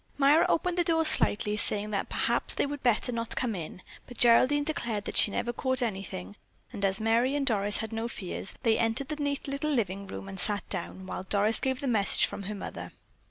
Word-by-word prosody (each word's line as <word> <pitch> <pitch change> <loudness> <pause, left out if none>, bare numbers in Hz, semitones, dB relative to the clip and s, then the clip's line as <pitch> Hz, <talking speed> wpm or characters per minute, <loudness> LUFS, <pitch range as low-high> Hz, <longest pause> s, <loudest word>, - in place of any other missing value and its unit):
Myra 290 +3 +5
opened 360 +2 0
the - - +4
door 325 -1 +2
slightly, 210 -8 +2
saying 210 0 +1
that 200 -1 -2
perhaps - - 0
they - - +1
would 285 0 -5
better 245 0 +1
not 230 -1 -2
come 245 -3 -1
in, 180 0 -7 0.2
but 245 - -11
Geraldine 255 +5 +5
declared 235 -9 -3
that - - -5
she - - +5
never 240 +4 -2
caught 260 +1 -1
anything, 190 - -5 0.4
and 200 - -5
as 195 0 +1
Merry 230 +5 +2
and 285 -1 0
Doris 205 -4 +3
had 220 0 -3
no 225 +1 -2
fears, 195 -3 -4
they 225 -3 +3
entered 230 +4 +1
the 305 - -3
neat 285 -1 -2
little 280 +2 -2
living 200 -8 -1
room 195 - -7
and 195 -1 -7
sat 205 +2 0
down, 190 0 -5
while 185 - -6
Doris 210 +3 +2
gave 260 -1 -2
the 280 - -3
message 215 -5 +3
from - - -6
her 210 - -4
mother. 195 - -7
225 Hz, 215 wpm, -28 LUFS, 200-275 Hz, 0.4 s, Myra